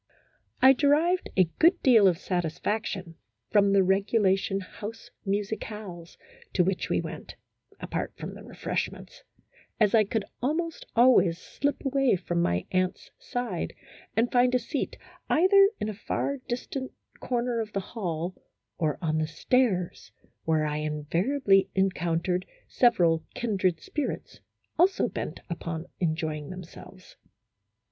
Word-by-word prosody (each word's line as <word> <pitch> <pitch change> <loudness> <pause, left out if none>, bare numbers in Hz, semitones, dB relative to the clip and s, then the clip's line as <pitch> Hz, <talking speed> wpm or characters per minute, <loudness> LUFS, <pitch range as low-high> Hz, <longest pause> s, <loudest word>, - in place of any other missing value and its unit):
I 265 +1 +9
derived 305 +7 +2
a 185 - +7 0.2
good 350 +3 +5
deal 225 -6 +7
of 175 -3 +3
satisfaction 180 +1 -3 0.3
from 200 -1 +4
the 195 -1 +5
regulation 195 0 +2
house 210 +4 -9 0.2
musicales 200 -3 -4 0.4
to 180 - +4
which 185 +1 -1
we - - +2
went - - -7 0.4
(apart - - -3
from - - -6
the - - -11
refreshments), - - -4 0.6
as 210 -3 +4
I 220 -2 +6
could 210 0 -2 0.2
almost 320 +5 -2
always 230 -8 +5
slip 285 +10 -3
away 270 -4 +3
from 175 -1 -1
my 90 - 0
aunt's 185 0 -1
side 240 -8 -3 0.4
and 235 +2 +2
find 250 0 +4
a - - +6
seat, 250 +4 -3 0.3
either 390 +4 +6
in 210 - -2
a 215 - -3
far 280 +6 -2
distant 260 +1 -4 0.3
corner 240 -1 -1
of 220 -1 -3
the 195 - 0
hall, 180 -4 -4 0.5
or 155 -4 0
on 155 -1 +1
the 155 - 0
stairs, 185 +2 0 0.3
where 160 -1 +2
I 150 0 -1
invariably 185 - +1
encountered 180 -1 0 0.2
several 175 -10 +3
kindred 190 -8 0
spirits, 295 - -4 0.4
also 375 +3 +4
bent - - -5
upon 165 -1 -4
enjoying 155 -3 -2
themselves. 185 +1 -11
195 Hz, 130 wpm, -27 LUFS, 175-245 Hz, 0.6 s, I